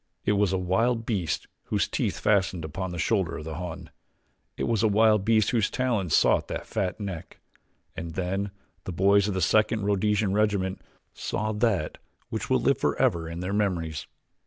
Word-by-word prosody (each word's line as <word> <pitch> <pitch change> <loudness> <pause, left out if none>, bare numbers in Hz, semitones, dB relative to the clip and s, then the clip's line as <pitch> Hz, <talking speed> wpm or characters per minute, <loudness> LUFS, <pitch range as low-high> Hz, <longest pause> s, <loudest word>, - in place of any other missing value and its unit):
It - - +3
was 100 -2 +2
a 95 - +1
wild 115 +6 +1
beast 95 -10 -1 0.2
whose - - 0
teeth - - -1
fastened 95 -5 +1
upon 95 +5 -4
the 90 - -5
shoulder 95 0 0
of 75 - -8
the 80 - -5
Hun 90 0 -6 0.7
it - - -2
was 115 -3 +1
a 110 - +4
wild 105 -1 +4
beast 110 -1 +3
whose 115 -4 +2
talons 115 - 0
sought - - +3
that - - -4
fat 95 +1 -2
neck. 95 -5 -6 0.6
And 80 -1 -6
then 95 +2 -1 0.4
the 95 - -4
boys 100 +3 +4
of 100 - -2
the 95 - -1
Second 110 +4 +3
Rhodesian 105 0 +1
Regiment 100 -3 +1 0.3
saw 110 +1 -2
that 105 -7 0 0.3
which - - -4
will - - +3
live - - +2
forever 80 -1 +1
in 85 +1 -5
their 90 +2 -3
memories. 85 -7 -1
100 Hz, 180 wpm, -27 LUFS, 90-105 Hz, 0.7 s, a